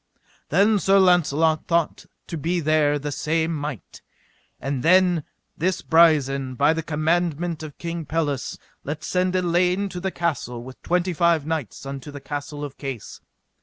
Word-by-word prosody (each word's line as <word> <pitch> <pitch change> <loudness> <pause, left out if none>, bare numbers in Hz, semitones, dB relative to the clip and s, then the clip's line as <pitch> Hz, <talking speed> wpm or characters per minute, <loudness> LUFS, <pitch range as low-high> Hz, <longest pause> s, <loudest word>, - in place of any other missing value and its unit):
Then 200 +6 +4
Sir 195 +3 +4
Launcelot 165 -4 +3
thought 170 -2 0 0.2
to 170 - -6
be 170 +3 -1
there 150 -2 +2
the 145 +1 -4
same 160 +3 0
might. 145 - -6 0.6
And 135 -2 -3
then 180 0 +4 0.3
this 185 +3 -1
Brisen 140 -5 +3
by 145 +4 +4
the 165 - -2
commandment 165 +1 -1
of 155 -2 -8
King 170 -2 -5
Pelles 145 -4 -2 0.3
let 150 +2 -5
send 185 0 0
Elaine 180 +2 +1
to 180 - -6
this 190 +1 -3
castle 140 -8 -2
with 130 +1 -11
twenty 180 +1 0
five 170 -3 +2
knights 155 - -4
unto 135 +1 -6
the 145 0 -8
Castle 145 +1 -6
of 140 - -10
Case. 135 -6 -6
160 Hz, 155 wpm, -23 LUFS, 145-175 Hz, 0.6 s, Then